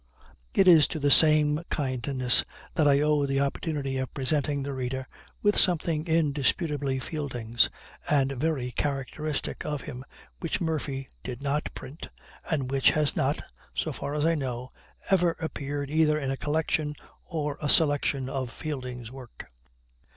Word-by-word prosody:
It 190 - +5
is 165 -5 +8
to 155 - -4
the 145 0 +2
same 150 0 +6
kindness 130 -2 +1 0.3
that 155 -4 +3
I 140 0 +5
owe 150 -1 +2
the 135 0 0
opportunity 140 -1 -1
of 130 -2 -3
presenting 145 +1 0
the 140 0 -4
reader 130 0 -3 0.4
with 205 0 +4
something 165 -3 +2
indisputably 145 -2 +1
Fielding's 125 -5 0 0.4
and 140 -2 +3
very 135 -2 -1
characteristic 145 +2 -2
of 150 -2 -3
him, 130 -3 -7 0.4
which 165 - -2
Murphy 145 -5 -2 0.2
did 125 +1 -6
not 145 +2 -1
print, 135 +5 -8 0.4
and 140 -6 -1
which 135 -1 +4
has 150 -2 +2
not, 140 +3 0 0.3
so 155 - -1
far 140 +3 -4
as 150 0 +1
I 165 - +4
know, 125 -4 -4 0.4
ever 175 -3 +3
appeared 145 -2 -4
either 155 -1 +3
in 135 -3 -2
a - - -1
collection 150 0 -1 0.3
or 150 -4 -3
a 150 - -1
selection 145 -4 +3
of 130 -2 -3
Fielding's 125 -5 -6
work. 130 -3 -11
145 Hz, 150 wpm, -27 LUFS, 135-155 Hz, 0.4 s, is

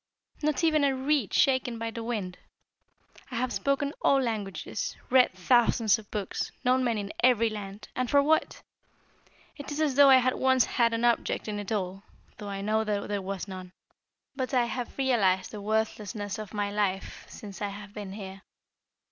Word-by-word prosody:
Not 305 +1 0
even 310 -2 +3
a 275 -1 +3
reed 265 -5 0
shaken 260 -3 +2
by 225 0 -3
the 230 - -6
wind! 210 -6 -4 0.9
I 255 - -7
have 245 +1 -1
spoken 280 +1 0
all 275 - +4
languages, 215 -6 -3
read 255 -1 +6
thousands 225 +2 +3
of 215 - -15
books, 205 -3 -3
known 255 +1 +3
men 235 -3 +1
in 200 0 -4
every 230 -3 +4
land 205 -1 -7
and 255 -1 -1
for 285 - +5
what? 315 +2 +1 0.9
It 285 0 -8
is 290 - -4
as 305 -3 +2
though 280 +1 +7
I 265 - +9
had 255 0 +2
once 260 -1 +3
had 230 -2 +1
an 230 +1 0
object 235 -1 +1
in 210 -1 -3
it 205 0 -6
all, 195 -2 -2 0.4
though 205 -1 -6
I 195 0 -4
know 215 +2 +1
that 205 -2 -2
there 205 -1 -1
was 195 0 -5
none. 185 -1 -8 0.6
But 260 0 -2
I 245 -1 +4
have 245 +1 -5
realised 210 -9 +2
the 210 - -7
worthlessness 210 -1 -2
of 215 -2 -7
my 205 -1 -2
life 200 -2 -2
since 200 -2 -10
I 205 - 0
have 205 0 -9
been 205 -3 -7
here. 195 -1 -8
220 Hz, 185 wpm, -28 LUFS, 200-255 Hz, 0.9 s, I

